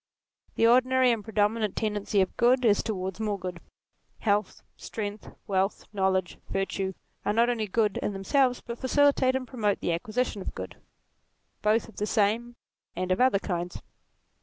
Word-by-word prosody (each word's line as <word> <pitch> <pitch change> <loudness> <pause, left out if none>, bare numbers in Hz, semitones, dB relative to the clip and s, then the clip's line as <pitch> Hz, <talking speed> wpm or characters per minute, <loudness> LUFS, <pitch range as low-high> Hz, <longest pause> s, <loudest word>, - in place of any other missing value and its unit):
The - - +3
ordinary 255 +1 +5
and 225 -3 -1
pre 220 - -9
dominant 210 0 +1
tendency 210 -2 0
of 190 - -1
good 250 +1 +3
is 205 -3 +4
towards 190 -3 -4
more 210 -2 -1
good. 180 -2 -6 0.6
Health, 205 -1 0
strength, 210 -1 -6 0.2
wealth, 195 0 0
knowledge, 190 -2 0
virtue, 195 0 -2 0.3
are 205 - 0
not 235 +2 +3
only 220 -3 -2
good 210 0 +1
in - - -1
themselves 250 +6 +1
but 235 0 -7
facilitate 265 -1 +3
and 260 -1 -2
promote 215 -5 0
the 170 - 0
acquisition 215 +4 -2
of - - -6
good, - - -7 0.8
both 215 +2 +2
of 225 - -16
the 210 - -1
same 225 +4 +1 0.4
and 185 +1 -2
of 185 - +2
other 255 -5 +5
kinds. 175 -3 -4
210 Hz, 160 wpm, -27 LUFS, 195-240 Hz, 0.8 s, ordinary